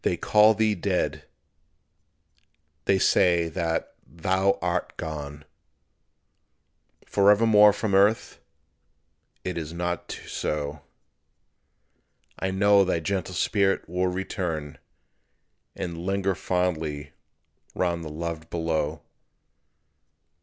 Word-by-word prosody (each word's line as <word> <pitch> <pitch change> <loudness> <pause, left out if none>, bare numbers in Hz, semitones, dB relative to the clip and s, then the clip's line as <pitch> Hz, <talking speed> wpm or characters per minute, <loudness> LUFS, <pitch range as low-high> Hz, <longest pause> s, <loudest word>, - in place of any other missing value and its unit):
They - - +1
call 105 +1 +5
thee 110 0 +2
dead. 95 -1 -2 1.6
They 100 - +3
say 85 -2 +3
that 80 -1 -2
thou 95 +4 0
art 90 0 -2
gone, 75 -1 -6 1.6
Forevermore 105 +1 +5
from 105 0 -3
earth. 100 +3 +2 1.0
It 90 -2 -3
is 80 0 -6
not 90 0 -3
so; 75 0 -3 1.6
I 95 - -1
know 100 +1 +4
thy 95 -3 0
gentle 95 +1 -3
spirit 100 0 +1
will 90 +2 0
return 90 -5 -4 1.0
And 85 -2 -5
linger 95 +1 0
fondly 80 -6 -2 0.6
round 85 -2 -1
the 80 - -6
loved 80 +1 -5
below. 80 -2 -2
90 Hz, 90 wpm, -25 LUFS, 80-100 Hz, 1.6 s, call